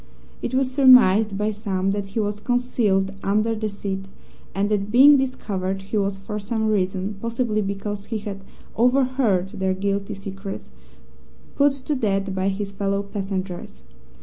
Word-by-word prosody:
It -, -, -3 dB
was 260 Hz, -1 st, +1 dB
surmised, 225 Hz, -7 st, +6 dB
by 210 Hz, +1 st, 0 dB
some, 195 Hz, -2 st, -1 dB
that 200 Hz, 0 st, -3 dB
he 195 Hz, +3 st, -3 dB
was 205 Hz, -1 st, -1 dB
concealed 215 Hz, -5 st, +1 dB
under 215 Hz, +3 st, +1 dB
the 215 Hz, -1 st, -2 dB
seat, 195 Hz, -1 st, -5 dB, 0.5 s
and 195 Hz, +1 st, +1 dB
that, 205 Hz, -1 st, 0 dB
being 270 Hz, +6 st, +8 dB
discovered, 195 Hz, -8 st, -2 dB
he 200 Hz, +3 st, -3 dB
was 195 Hz, -1 st, 0 dB
for 210 Hz, +2 st, -5 dB
some 220 Hz, +1 st, -1 dB
reason, 190 Hz, 0 st, -1 dB
possibly 230 Hz, -2 st, -1 dB
because 200 Hz, 0 st, -4 dB
he 225 Hz, -, -3 dB
had 200 Hz, -2 st, -7 dB, 0.3 s
overheard 250 Hz, -6 st, +2 dB
their 190 Hz, -1 st, -1 dB
guilty 200 Hz, +1 st, -2 dB
secrets, 195 Hz, -, -7 dB, 0.8 s
put 285 Hz, 0 st, +3 dB
to 275 Hz, +2 st, -4 dB
death 195 Hz, -5 st, 0 dB
by 190 Hz, 0 st, -1 dB
his 195 Hz, +1 st, -2 dB
fellow 200 Hz, 0 st, -1 dB
passengers. 190 Hz, -, -5 dB
200 Hz, 150 wpm, -23 LUFS, 195-225 Hz, 0.8 s, being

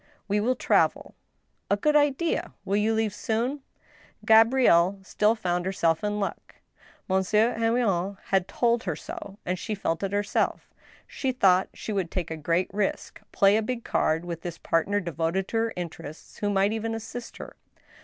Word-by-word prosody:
" -, -, -37 dB
We 205 Hz, +1 st, +1 dB
will 245 Hz, +5 st, +1 dB
travel." -, -, +1 dB, 0.3 s
" -, -, -46 dB
A 200 Hz, -, +3 dB
good 300 Hz, +8 st, +1 dB
idea. 295 Hz, +3 st, +1 dB
Will 195 Hz, -, 0 dB
you 210 Hz, +2 st, +2 dB
leave 220 Hz, -2 st, 0 dB
soon? 235 Hz, +7 st, -2 dB, 0.3 s
" -, -, -24 dB
Gabrielle 220 Hz, -5 st, +5 dB
still 210 Hz, +3 st, +2 dB
found 180 Hz, -5 st, -1 dB
herself 165 Hz, -3 st, +1 dB
in 210 Hz, 0 st, -1 dB
luck. 200 Hz, -, -5 dB, 0.5 s
Monsieur 210 Hz, +5 st, +2 dB
Henrion 220 Hz, -5 st, 0 dB
had 190 Hz, -2 st, +2 dB
told 235 Hz, +3 st, +1 dB
her 170 Hz, -5 st, -1 dB
so, 200 Hz, +5 st, -9 dB
and 180 Hz, 0 st, -2 dB
she 215 Hz, +3 st, -3 dB
felt 165 Hz, -4 st, -2 dB
it 195 Hz, -1 st, -2 dB
herself. 205 Hz, 0 st, -1 dB, 0.3 s
She 265 Hz, -, -2 dB
thought 190 Hz, -7 st, +3 dB
she 215 Hz, -, -5 dB
would 190 Hz, -4 st, -1 dB
take 175 Hz, -3 st, -4 dB
a -, -, -2 dB
g^reat 170 Hz, +4 st, +1 dB
risk, 205 Hz, -1 st, -2 dB
play 200 Hz, +1 st, +4 dB
a -, -, +1 dB
big 235 Hz, +1 st, -4 dB
card 160 Hz, +2 st, 0 dB
with 170 Hz, -1 st, -5 dB
this 175 Hz, -2 st, -6 dB
partner 200 Hz, +6 st, 0 dB
devoted 170 Hz, +2 st, -2 dB
to 225 Hz, -, -1 dB
her 225 Hz, 0 st, 0 dB
interests, 165 Hz, -3 st, -8 dB
who 205 Hz, -, 0 dB
might 200 Hz, +1 st, +2 dB
even 225 Hz, 0 st, -2 dB
assist 230 Hz, +2 st, -7 dB
her. -, -, -9 dB
205 Hz, 180 wpm, -26 LUFS, 180-225 Hz, 0.5 s, Gabrielle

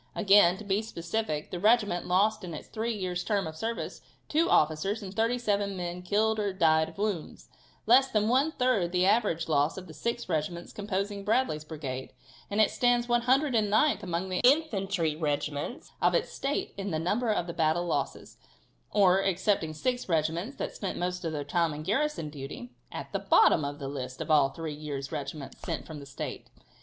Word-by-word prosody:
Again, 195 Hz, -4 st, +5 dB
to 215 Hz, -, -9 dB
be 200 Hz, 0 st, 0 dB
specific, 170 Hz, -5 st, -3 dB
the 180 Hz, -, -4 dB
regiment 210 Hz, -3 st, +3 dB
lost 200 Hz, +4 st, +2 dB
in 170 Hz, -3 st, -6 dB
its -, -, -9 dB
three 225 Hz, +2 st, -2 dB
years' 180 Hz, -3 st, -3 dB
term 205 Hz, -3 st, 0 dB
of 160 Hz, 0 st, -6 dB
service 225 Hz, +7 st, -4 dB, 0.3 s
two 325 Hz, +3 st, +2 dB
officers 160 Hz, +8 st, +2 dB
and 190 Hz, -1 st, -7 dB
thirty 230 Hz, +3 st, +1 dB
seven 200 Hz, -4 st, -1 dB
men 175 Hz, 0 st, -4 dB
killed 215 Hz, +4 st, +1 dB
or 205 Hz, -2 st, -1 dB
died 160 Hz, -3 st, +3 dB
of 165 Hz, -, -16 dB
wounds, 200 Hz, -5 st, -3 dB, 0.4 s
less 265 Hz, +1 st, +6 dB
than 215 Hz, -2 st, +1 dB
one 265 Hz, +6 st, +3 dB
third 250 Hz, -, +1 dB
the 180 Hz, 0 st, +3 dB
average 190 Hz, -6 st, +2 dB
loss 150 Hz, +1 st, +1 dB
of 190 Hz, -, -7 dB
the 160 Hz, -, -11 dB
six 235 Hz, +7 st, -3 dB
regiments 170 Hz, +1 st, -3 dB
composing 200 Hz, 0 st, -3 dB
Bradley's 210 Hz, -8 st, +1 dB
brigade, 140 Hz, -5 st, -6 dB, 0.4 s
and 205 Hz, -, -1 dB
it 215 Hz, -, +5 dB
stands 245 Hz, -1 st, +2 dB
109th 240 Hz, -2 st, +2 dB
among 180 Hz, -1 st, -3 dB
the 185 Hz, -, -1 dB
infantry 200 Hz, -, +2 dB
regiments 150 Hz, -, -3 dB
of -, -, +3 dB
its -, -, 0 dB
State 280 Hz, +1 st, -2 dB
in 200 Hz, 0 st, -3 dB
the 160 Hz, -, -1 dB
number 210 Hz, +9 st, 0 dB
of 180 Hz, -4 st, -1 dB
its 170 Hz, -, -6 dB
battle 160 Hz, +2 st, +2 dB
losses, 175 Hz, -, -3 dB, 0.5 s
or, 195 Hz, -2 st, +4 dB
excepting 190 Hz, -3 st, +1 dB
six 245 Hz, +7 st, -2 dB
regiments 165 Hz, -, 0 dB
that -, -, -4 dB
spent 195 Hz, -, -4 dB
most 180 Hz, +1 st, -2 dB
of 165 Hz, -, -2 dB
their 150 Hz, -2 st, -3 dB
time 160 Hz, +1 st, 0 dB
in 150 Hz, -, -6 dB
garrison 230 Hz, -, -1 dB
duty, 150 Hz, -, -8 dB, 0.2 s
at -, -, -7 dB
the -, -, 0 dB
bottom 160 Hz, -, +4 dB
of 145 Hz, 0 st, -4 dB
the 140 Hz, -2 st, -5 dB
list 130 Hz, -2 st, -6 dB
of -, -, -3 dB
all 145 Hz, -3 st, +5 dB
three 160 Hz, +1 st, -5 dB
years' 145 Hz, -2 st, -5 dB
regiments 140 Hz, 0 st, -6 dB
sent -, -, -4 dB
from 155 Hz, -2 st, -8 dB
the 140 Hz, -, -10 dB
State. 135 Hz, -, -6 dB
185 Hz, 190 wpm, -29 LUFS, 160-220 Hz, 0.5 s, less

